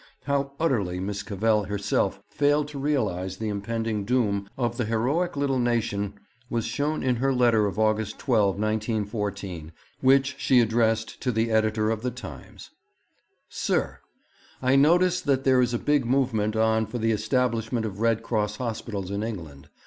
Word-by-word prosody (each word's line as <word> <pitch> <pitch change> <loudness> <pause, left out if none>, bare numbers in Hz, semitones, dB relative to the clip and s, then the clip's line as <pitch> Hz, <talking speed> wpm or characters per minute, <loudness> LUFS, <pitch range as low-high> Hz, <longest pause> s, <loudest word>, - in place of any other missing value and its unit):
How 140 -1 -1
utterly 105 - 0
Miss 100 +2 -3
Cavell 105 +1 +1
herself 100 0 -1
failed 145 0 +1
to 145 -2 -7
realize 100 -11 -1
the 110 +1 -3
impending 110 +1 -2
doom 100 -4 0
of 120 -2 -1
the 120 - 0
heroic 130 +10 0
little 140 -2 +1
nation 105 -4 0 0.3
was 115 -2 -1
shown 145 +6 -1
in 125 -2 +1
her 135 +3 +1
letter 120 -5 +3
of 100 - -5
August 110 0 +1
12, 105 -7 +2
1914, 105 -5 -2 0.3
which 135 +1 +4
she 130 -2 +4
addressed 115 -1 +1
to 125 - 0
the 115 0 0
Editor 110 0 +2
of 110 -1 -2
The 125 - -1
Times: 125 0 -10 0.8
'Sir, - - -1 0.6
'I 130 +1 +4
notice 175 +5 +4
that 135 -2 +1
there 130 -1 +4
is 120 -1 +1
a - - +2
big 145 +2 +1
movement 115 -4 +1
on 110 0 +2
for 110 - -5
the 115 -1 +1
establishment 115 +1 0
of 100 -2 -5
Red 115 0 +1
Cross 105 -3 -1
Hospitals 110 -5 -4
in 100 +1 -2
England. 85 -11 -6
115 Hz, 160 wpm, -26 LUFS, 105-130 Hz, 0.8 s, which